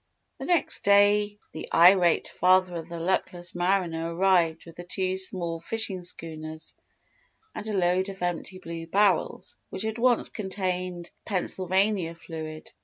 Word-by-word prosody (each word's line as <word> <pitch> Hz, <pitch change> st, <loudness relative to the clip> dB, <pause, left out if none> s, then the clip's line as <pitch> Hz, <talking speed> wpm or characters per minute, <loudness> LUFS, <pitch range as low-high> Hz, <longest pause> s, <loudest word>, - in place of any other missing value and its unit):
The -, -, -5 dB
next 350 Hz, -2 st, +2 dB
day 205 Hz, +1 st, +4 dB
the 160 Hz, -, -8 dB
irate 175 Hz, 0 st, +5 dB
father 185 Hz, 0 st, +3 dB
of 165 Hz, +1 st, -8 dB
the 170 Hz, 0 st, -6 dB
luckless 175 Hz, 0 st, -2 dB
mariner 175 Hz, -2 st, 0 dB
arrived 175 Hz, -3 st, +2 dB
with 165 Hz, 0 st, -13 dB
two 185 Hz, 0 st, -1 dB
small 175 Hz, -3 st, -1 dB
fishing 200 Hz, 0 st, -2 dB
schooners 160 Hz, -2 st, -6 dB, 0.8 s
and 215 Hz, -, -6 dB
a 210 Hz, -2 st, -1 dB
load 185 Hz, +1 st, +1 dB
of 195 Hz, -2 st, -7 dB
empty 175 Hz, +1 st, -3 dB
blue 165 Hz, -2 st, -7 dB
barrels 195 Hz, 0 st, +1 dB
which 190 Hz, -, -4 dB
had 220 Hz, +1 st, -3 dB
once 245 Hz, -1 st, +3 dB
contained 185 Hz, -3 st, -4 dB
"Pennsylvania 190 Hz, -2 st, 0 dB
Fluid." 160 Hz, -2 st, -8 dB
180 Hz, 135 wpm, -26 LUFS, 170-195 Hz, 0.8 s, irate